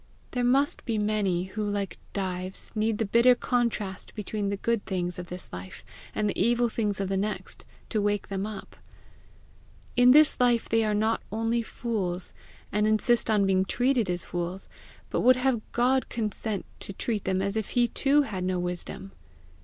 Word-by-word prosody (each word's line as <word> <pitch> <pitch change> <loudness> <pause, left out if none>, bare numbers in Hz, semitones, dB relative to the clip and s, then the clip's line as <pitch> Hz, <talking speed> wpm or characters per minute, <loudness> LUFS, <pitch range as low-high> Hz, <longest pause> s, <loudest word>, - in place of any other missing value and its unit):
There 250 -1 -1
must 270 +4 +2
be 225 -2 -1
many 210 -4 +1
who, 195 +3 -4
like 205 -4 -2
Dives, 185 -1 -3
need 215 0 0
the 225 - 0
bitter 235 +4 +5
contrast 235 -6 -2
between 210 -1 -2
the 200 - -2
good 230 +1 0
things 180 -2 -2
of 175 - -6
this 180 +1 -8
life 90 +1 -8 0.3
and 210 - +1
the 205 - -1
evil 240 0 +3
things 210 -3 -1
of 195 - -1
the 195 - -1
next, 210 +2 -3 0.2
to 215 - 0
wake 205 -1 0
them 195 +1 -2
up. 210 -2 -8 1.2
In 245 +1 +6
this 300 +3 +6
life 240 -2 +3
they 225 0 +2
are 210 -1 +1
not 220 +2 +1
only 225 +2 0
fools, 200 -6 -3 0.4
and 210 +1 +2
insist 225 +2 +2
on 210 -2 +4
being 190 -1 +3
treated 245 0 +1
as 175 0 +1
fools, 175 +2 -4 0.4
but - - +1
would 255 +1 +6
have 255 -2 +1
God 255 +2 +2
consent 215 -2 -3
to 200 - -4
treat 210 +1 -2
them 190 0 +1
as 200 +2 -1
if 220 -2 -2
he 240 -1 +3
too 285 +4 +3
had 195 -8 -4
no 185 0 0
wisdom! 180 +2 -5
210 Hz, 180 wpm, -27 LUFS, 190-235 Hz, 1.2 s, In